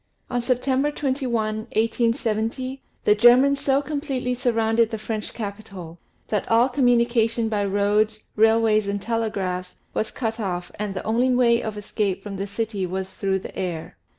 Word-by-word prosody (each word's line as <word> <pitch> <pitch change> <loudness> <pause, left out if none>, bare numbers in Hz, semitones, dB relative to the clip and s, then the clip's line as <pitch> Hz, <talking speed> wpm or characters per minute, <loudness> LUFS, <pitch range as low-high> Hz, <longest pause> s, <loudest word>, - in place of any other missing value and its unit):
On 245 -1 0
September 260 +3 +1
21, 275 -2 -2 0.3
1870, 230 +2 -1 0.2
the 210 - +5
Germans 250 +6 +5
so 275 +1 +2
completely 280 -4 -2
surrounded 230 -2 +2
the 225 - -3
French 215 0 -4
capitol, 200 -6 -7 0.3
that 210 - -1
all 230 +3 +4
communication 235 -3 +2
by 205 -2 0
Fig. 195 - -2
21. 200 0 +2
roads, 215 +1 +1
railways, 220 -1 +4
and 200 0 -1
telegraphs, 195 -5 -2 0.2
was 215 - -1
cut 225 -2 -3
off 180 -4 -3
and 210 -2 -3
the - - -4
only 235 +4 +2
way 240 -2 +4
of 215 -1 -5
escape 200 -2 -2
from 200 -2 -6
the 195 +1 -3
city 205 -2 -3
was 190 +1 -4
through 195 -1 0
the 190 - -9
air. 175 -4 -4
225 Hz, 160 wpm, -23 LUFS, 205-245 Hz, 0.3 s, the